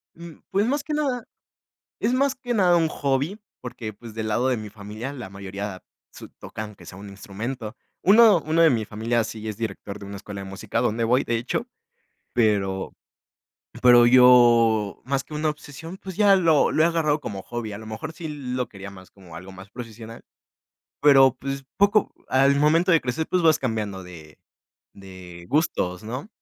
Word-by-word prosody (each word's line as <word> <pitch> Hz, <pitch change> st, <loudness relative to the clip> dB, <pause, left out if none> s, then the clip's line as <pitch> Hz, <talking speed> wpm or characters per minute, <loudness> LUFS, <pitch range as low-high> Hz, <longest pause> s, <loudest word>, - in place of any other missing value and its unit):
Mm, 170 Hz, -1 st, -11 dB
pues 200 Hz, +2 st, +1 dB
más 280 Hz, +4 st, -1 dB
que 300 Hz, -, -4 dB
nada. 265 Hz, -6 st, -1 dB, 0.8 s
Es 235 Hz, -, 0 dB
más 270 Hz, +1 st, +1 dB
que 245 Hz, -2 st, -4 dB
nada, 185 Hz, -5 st, +4 dB
un 165 Hz, -1 st, +2 dB
hobby. 145 Hz, +8 st, -1 dB, 0.2 s
Porque 115 Hz, -3 st, -6 dB
pues, 115 Hz, +1 st, -12 dB
del 110 Hz, 0 st, -4 dB
lado 120 Hz, +4 st, +1 dB
de 125 Hz, -, 0 dB
mi 110 Hz, -1 st, -7 dB
familia, 105 Hz, +5 st, -7 dB
la 120 Hz, -8 st, -8 dB
mayoría 100 Hz, 0 st, -7 dB, 0.3 s
su -, -, -12 dB
tocan, 110 Hz, 0 st, -8 dB
aunque 105 Hz, -, -15 dB
sea 90 Hz, -, -11 dB
un 100 Hz, 0 st, -10 dB
instrumento. 105 Hz, +4 st, -6 dB, 0.3 s
Uno 210 Hz, -3 st, +6 dB
uno 160 Hz, +2 st, +2 dB
de 165 Hz, -, +7 dB
mi 115 Hz, -6 st, 0 dB
familia, 115 Hz, +2 st, -1 dB
sí 110 Hz, 0 st, -7 dB
es 105 Hz, -, -5 dB
director 105 Hz, -2 st, -6 dB
de 100 Hz, -, -9 dB
una 100 Hz, -, -8 dB
escuela 100 Hz, 0 st, -8 dB
de 95 Hz, -, -8 dB
música, 95 Hz, +4 st, -3 dB
donde 115 Hz, -1 st, 0 dB
voy, 125 Hz, +3 st, +2 dB
de 115 Hz, 0 st, -1 dB
hecho. 120 Hz, +2 st, -3 dB, 0.7 s
Pero 100 Hz, -5 st, 0 dB, 0.9 s
pero 120 Hz, -1 st, +7 dB
yo, 120 Hz, -4 st, +5 dB
más 135 Hz, +1 st, -1 dB
que 150 Hz, -, -11 dB
una 155 Hz, +1 st, 0 dB
obsesión, 150 Hz, +3 st, -9 dB
pues 190 Hz, -2 st, -9 dB
ya 200 Hz, -2 st, +5 dB
lo 165 Hz, -5 st, +3 dB
lo 155 Hz, -, +3 dB
he 165 Hz, -, +5 dB
agarrado 155 Hz, -3 st, +1 dB
como 100 Hz, -8 st, -6 dB
hobby. 120 Hz, -3 st, -6 dB
A 100 Hz, -, -7 dB
lo 110 Hz, -, -11 dB
mejor, 110 Hz, +9 st, -6 dB
sí 160 Hz, 0 st, -7 dB
lo 130 Hz, -4 st, -4 dB
quería 100 Hz, 0 st, -10 dB
más 95 Hz, -2 st, -14 dB
como 90 Hz, -4 st, -15 dB
algo 90 Hz, +3 st, -10 dB
más 95 Hz, +1 st, -13 dB
profesional, 115 Hz, -1 st, -10 dB, 0.8 s
pero 135 Hz, -3 st, +6 dB
pues, 135 Hz, +1 st, -5 dB
poco 205 Hz, +1 st, +3 dB, 0.2 s
Al 135 Hz, +1 st, +4 dB
momento 160 Hz, +5 st, +3 dB
de 165 Hz, -, +5 dB
crecer, 130 Hz, +6 st, -3 dB
pues 180 Hz, -1 st, +1 dB
vas 160 Hz, -2 st, +4 dB
cambiando 105 Hz, -7 st, -3 dB
de 80 Hz, -4 st, -13 dB, 0.6 s
de 90 Hz, -3 st, -12 dB
gustos, 95 Hz, -, 0 dB
¿no? 125 Hz, -, -6 dB
120 Hz, 190 wpm, -24 LUFS, 105-155 Hz, 0.9 s, de